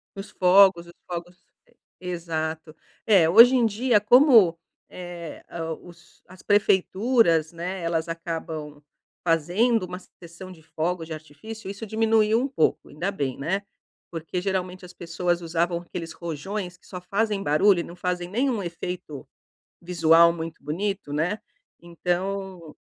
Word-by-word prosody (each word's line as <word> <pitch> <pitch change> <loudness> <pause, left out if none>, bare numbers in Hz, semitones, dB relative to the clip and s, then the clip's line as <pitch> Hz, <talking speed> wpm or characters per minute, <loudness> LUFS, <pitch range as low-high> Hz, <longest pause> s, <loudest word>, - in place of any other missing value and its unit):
os 195 +1 -8
fogos 185 -1 +5
os 170 - -14 0.2
fogos 175 +1 -7 0.6
e 180 - -8
exato. 160 -2 -4 0.3
É, 190 -7 +5
hoje 235 +8 +8
em 245 -2 +3
dia, 225 +1 +2
como, 225 - +6 0.3
eh, 175 -3 -9 0.4
o - - -14
os 170 0 -19
as 185 +1 -15
prefeituras, 200 -3 +2
né. 175 +2 -5
Elas 165 -1 -1
acabam 160 -3 -6 0.4
fazendo 185 +7 +2
uma 180 0 -7 0.2
sessão 175 +2 -11
de 170 -3 -14
fogos 165 +2 -3
de 160 - -6
artifício, 175 +8 -9
isso 200 +3 -8
diminuiu 220 0 +2
um 270 - -1
pouco. 265 - 0
Ainda 175 +6 -3
bem, 140 -9 -3
né. 190 +8 -2 0.5
Porque 165 +2 -4
geralmente 185 -1 -3
as 180 - -13
pessoas 175 0 -2
usavam 170 +1 -1
aqueles 170 -1 -7
rojões 180 +3 -5
que - - -27
só 180 -2 -8
fazem 200 +2 -1
barulho 185 +4 +3
e - - -2
não 170 - -11
fazem 180 0 -3
nenhum 240 +2 0
efeito 170 -4 -6 0.5
visual 170 -1 +4
muito 165 -1 -7
bonito, 180 +1 -3
né. 175 +8 -1 0.4
Então 180 0 -4
180 Hz, 140 wpm, -24 LUFS, 165-200 Hz, 0.6 s, hoje